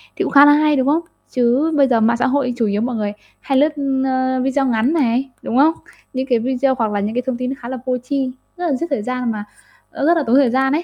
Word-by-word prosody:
thì - - -1
cũng - - -3
khá 285 +1 +8
là 290 - +7
hay, 300 0 +3
đúng 265 -1 0
không? 310 +4 +2 0.3
Chứ 255 +6 +1
bây 275 -2 +5
giờ 235 -3 +2
mạng 235 +2 +2
xã - - +1
hội 260 -2 0
chủ 230 - +1
yếu 205 +1 -1
mọi 245 0 -2
người 210 -1 -2 0.3
hay 270 - -1
lướt, 300 +3 +3 0.4
ơ, 260 0 0
video 270 +1 0
ngắn 245 +3 +1
này, 265 -3 0
đúng 240 - -2
không? 305 +4 +5 0.4
Những 260 0 -2
cái 240 -2 +3
video 260 +2 0
hoặc 225 -4 0
là 205 - -1
những 210 +3 -3
cái 250 - 0
thông 260 -2 -2
tin 255 0 -3
nó 270 - -3
khá 240 - -8
là 260 - -4
vô 255 -1 0
tri, 260 +1 -3 0.3
rất 350 -1 -2
là 295 - 0
giết 335 +7 -3
thời 275 -8 -1
gian 250 -1 -2
mà 210 -2 -5 0.5
nó - - -3
rất 335 +2 +4
là 315 - +1
tốn 240 - +3
thời 275 -3 +4
gian 265 +2 +1
ấy. 325 +3 0
260 Hz, 290 wpm, -18 LUFS, 240-280 Hz, 0.5 s, khá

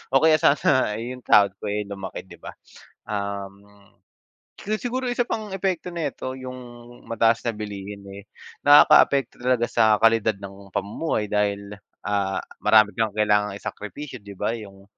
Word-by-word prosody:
o 135 - +6
kaya 155 -1 +5
sana 140 -7 +3
'yung 125 +3 -6
sahod 100 -1 +5
ko, 105 - -6
eh, 105 +1 -1
lumaki 100 -2 -7
'di 95 - -15
ba. - - -10 0.5
Um, 100 -1 -5 0.9
so 215 +2 -3
siguro 255 +2 -3
isa 245 0 +1
pang 215 -4 -4
epekto 180 -2 -2
nito 140 -5 -4
'yung 130 -1 -8 0.5
mataas 115 0 +2
na 115 - 0
bilihin, 100 -1 -7
eh, 100 +1 -11 0.4
nakakaapekto 145 -2 +6
talaga 125 -1 0
sa 110 -2 +4
kalidad 115 -1 +4
ng 100 -1 -11
pamumuhay 105 - -2
dahil, 100 -1 -1 0.3
ah, 100 -2 -1 0.2
marami 110 -2 +5
kang 110 -2 0
kailangang 105 -1 +2
isakripisyo, 130 +7 -7
'di 100 -1 -11
ba 105 +4 -2
'yung, 100 -2 -12
110 Hz, 150 wpm, -24 LUFS, 100-130 Hz, 0.9 s, o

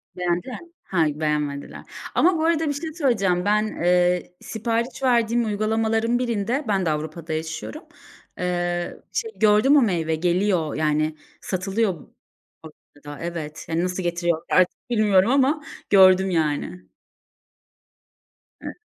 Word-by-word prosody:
Beğendiler 180 - -2
mi? 345 - -16
Ha, 170 -4 +1
beğenmediler. 150 -2 -2 0.3
Ama 355 -1 +4
bu 315 - 0
arada 325 -1 +1
bir 290 - 0
şey 315 +2 -5
söyleyeceğim. 200 - +1
Ben, 210 +1 +2
eee, 180 -1 +1
sipariş 230 +4 -3
verdiğim 235 -2 +2
uygulamaların 220 +2 0
birinde, 240 +3 -1
ben 195 -3 +1
de - - +1
Avrupa'da 155 +1 -4
yaşıyorum, 160 - -5 0.5
eee, 175 -1 -2 0.2
şey 450 -2 -2
gördüm; 220 +7 +5
o - - +6
meyve 165 -7 0
geliyor 175 -1 0
yani 155 0 0 0.3
satılıyor 195 +2 -1 0.7
Avrupa'da. 145 -2 -13
Evet, 160 -3 -6
hani, 165 +2 0
nasıl 180 0 -2
getiriyor 175 -1 -1
artık 185 +6 +1
bilmiyorum 215 -1 +3
ama 280 +2 +2 0.3
gördüm 190 -1 +6
yani. 160 +2 -2 1.7
Evet. - - -8
185 Hz, 125 wpm, -23 LUFS, 170-230 Hz, 1.7 s, o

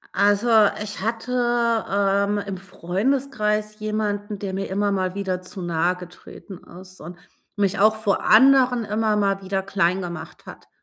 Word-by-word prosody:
Also, 205 +3 +2 0.4
ich 210 -2 -7
hatte, 230 +4 -3 0.6
ähm, 200 +1 +1
im 200 -2 -4
Freundeskreis 210 +3 -2
jemanden, 210 -1 -3
der 195 -1 -5
mir 195 +1 -4
immer 200 +1 0
mal 185 -1 -1
wieder 190 -2 -3
zu 185 +1 -9
nahegetreten 180 +2 -4 0.2
ist 185 0 -13
und 170 +3 -9 0.4
mich 200 -1 0
auch 215 +1 +4
vor 215 -2 -1
anderen 250 0 +5
immer 215 +1 0
mal 195 -1 0
wieder 190 0 -2
klein 190 -1 0
gemacht 170 -2 -8
hat. - - -12
200 Hz, 145 wpm, -22 LUFS, 190-215 Hz, 0.6 s, anderen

